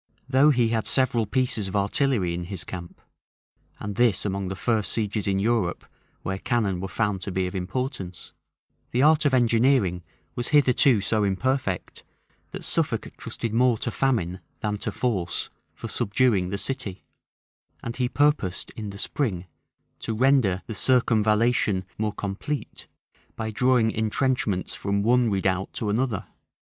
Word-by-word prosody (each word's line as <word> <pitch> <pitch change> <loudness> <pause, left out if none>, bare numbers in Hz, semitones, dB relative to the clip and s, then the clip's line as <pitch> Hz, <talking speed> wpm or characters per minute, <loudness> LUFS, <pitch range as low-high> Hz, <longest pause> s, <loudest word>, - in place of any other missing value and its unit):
Though 135 +3 +5
he 120 -5 +3
had 110 -1 -1
several 120 -4 +2
pieces 120 -4 0
of 95 - -5
artillery 100 -2 +1
in 85 0 -4
his 95 -1 -6
camp, 85 -2 -8 0.8
(and 105 0 -5
this 120 -4 +4
is - - -4
among 100 -1 -2
the 95 - -4
first 110 0 0
sieges 105 -2 -1
in 95 -1 +1
Europe 105 -3 0 0.4
where 95 0 -3
cannon 105 -7 0
were 95 - -3
found 100 -1 -1
to 100 - -3
be 95 0 0
of 90 - -4
importance,) 95 - -4 0.6
the 125 +3 +1
art 155 0 +5
of 140 - +3
engineering 115 -6 +3 0.3
was 120 - -2
hitherto 130 -5 +4
so 110 +1 +1
imperfect, 100 0 -1 0.5
that - - -8
Suffolk - - -1
trusted 115 -2 -5
more 120 0 +3
to 115 - -2
famine 110 -11 0 0.2
than 105 -2 -2
to - - -3
force 100 -9 -1 0.3
for - - -7
subduing 105 -4 +1
the 100 - -2
city; 110 -5 -4 0.8
and 115 0 -5
he 125 -2 0
purposed 145 -11 +1
in 105 -2 -6
the 100 - -8
spring 100 -6 -2 0.5
to 110 - -3
render 120 -7 +3
the 115 - -6
circumvallation 110 -3 +2
more 105 -1 -1
complete, 105 +9 -5 0.5
by 110 0 -3
drawing 125 -1 +3
intrenchments 110 -3 0
from 100 0 -1
one 120 +1 +3
redoubt 95 -1 0
to 105 -2 -2
another. 115 -2 -1
110 Hz, 155 wpm, -25 LUFS, 95-125 Hz, 0.8 s, Though